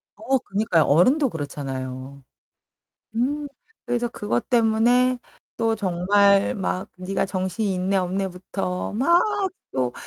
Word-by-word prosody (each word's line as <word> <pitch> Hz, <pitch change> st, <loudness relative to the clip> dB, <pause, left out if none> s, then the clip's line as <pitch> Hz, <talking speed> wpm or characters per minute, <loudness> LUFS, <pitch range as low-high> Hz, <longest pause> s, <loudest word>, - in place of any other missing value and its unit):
어 255 Hz, +6 st, +1 dB
그니까요. 200 Hz, -7 st, +1 dB
어른도 255 Hz, -, +4 dB
그렇잖아요. 135 Hz, -3 st, -6 dB, 0.9 s
음. 290 Hz, +5 st, -1 dB, 0.4 s
그래서 240 Hz, 0 st, -1 dB
그것 205 Hz, -, -3 dB
때문에 245 Hz, +2 st, +3 dB, 0.4 s
또 225 Hz, 0 st, +1 dB
정말 200 Hz, +1 st, +3 dB
막 185 Hz, -1 st, -3 dB
니가 185 Hz, +1 st, -1 dB
정신이 190 Hz, +2 st, -2 dB
있네 185 Hz, +2 st, 0 dB
없네부터 185 Hz, 0 st, -3 dB
막 340 Hz, +10 st, +4 dB, 0.5 s
또 125 Hz, -2 st, -1 dB
195 Hz, 230 characters per minute, -23 LUFS, 180-230 Hz, 0.9 s, 어른도